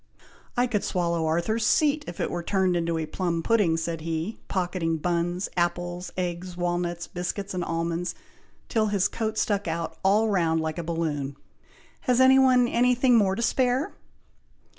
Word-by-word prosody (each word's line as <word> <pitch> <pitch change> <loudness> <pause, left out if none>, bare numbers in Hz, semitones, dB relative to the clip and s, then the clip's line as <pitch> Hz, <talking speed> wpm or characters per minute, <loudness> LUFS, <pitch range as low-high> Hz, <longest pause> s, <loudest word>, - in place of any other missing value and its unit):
"I 245 - +4
could 225 -5 -1
swallow 170 -3 0
Arthur's 175 +8 0
Seat 295 +6 +3
if 175 - -7
it - - -1
were 175 - -2
turned 185 0 +1
into 170 -1 0
a 160 - -2
plum 170 +1 -2
pudding," 200 -7 +3
said 165 0 -3
he, 165 +6 -3
pocketing 175 -3 -1
buns, 175 +3 -1
apples, 175 0 -1
eggs, 180 0 -3
walnuts, 175 -1 -1
biscuits, 190 +3 -4
and 180 -1 -2
almonds, 170 +1 -2 0.5
till 220 -3 +1
his 200 -2 +2
coat 220 -1 -3
stuck 205 -2 0
out 165 0 -3
all 210 +3 +4
round 170 -6 +2
like 160 +1 -3
a - - -3
balloon. 155 -4 -2 0.7
"Has 250 0 +4
any 260 +1 +7
one 255 -2 +5
any 245 +1 +3
thing 250 0 +4
more 195 -4 +3
to 235 - -2
spare?" 255 +3 +1
180 Hz, 165 wpm, -26 LUFS, 170-220 Hz, 0.7 s, any